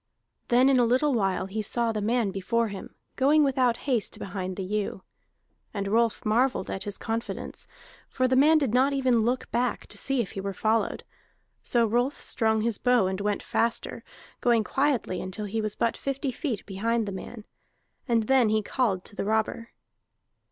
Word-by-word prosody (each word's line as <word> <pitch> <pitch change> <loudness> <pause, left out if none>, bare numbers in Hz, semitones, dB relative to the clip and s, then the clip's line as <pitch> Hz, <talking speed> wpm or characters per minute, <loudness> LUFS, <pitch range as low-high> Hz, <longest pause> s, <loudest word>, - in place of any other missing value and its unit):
Then 250 +2 +4
in 270 -2 +4
a - - +5
little 260 +5 +2
while 195 -5 0
he 205 +3 -3
saw 235 +2 0
the 215 -1 -3
man 225 -1 +1
before 225 +4 0
him, 200 -1 -9 0.2
going 295 +3 +4
without 255 -4 +2
haste 250 -7 0
behind 185 -1 -5
the 195 - -4
ewe. 200 0 -3 0.7
And 200 -1 -2
Rolf 225 +2 +1
marvelled 235 0 +1
at 190 - -3
his 205 -1 -1
confidence, 225 +1 -5 0.4
for 255 -1 +1
the 260 - +2
man 300 +4 +6
did 275 -7 0
not 265 +3 +3
even 260 -4 +2
look 245 +3 -1
back 245 +1 -1
to - - -7
see 270 -1 0
if 220 -6 -1
he 195 - -5
were 195 0 -4
followed. 220 +3 0 0.6
So 235 -1 +2
Rolf 245 +6 0
strung 220 -2 0
his 230 -1 -1
bow 245 -5 +3
and 190 +1 -2
went 205 0 -1
faster, 230 0 -1 0.4
going 235 -2 +3
quietly 265 -8 0
until 190 +3 -5
he 220 +2 -2
was 215 -1 -3
but 230 -1 0
fifty 275 0 -3
feet 245 - -4
behind 225 +3 -1
the 200 - -4
man. 210 +3 -8 0.6
And 230 -3 +2
then 255 -1 +3
he 215 0 +1
called 200 -6 -1
to - - -12
the - - -3
robber. 220 +2 -1
230 Hz, 185 wpm, -27 LUFS, 205-250 Hz, 0.7 s, man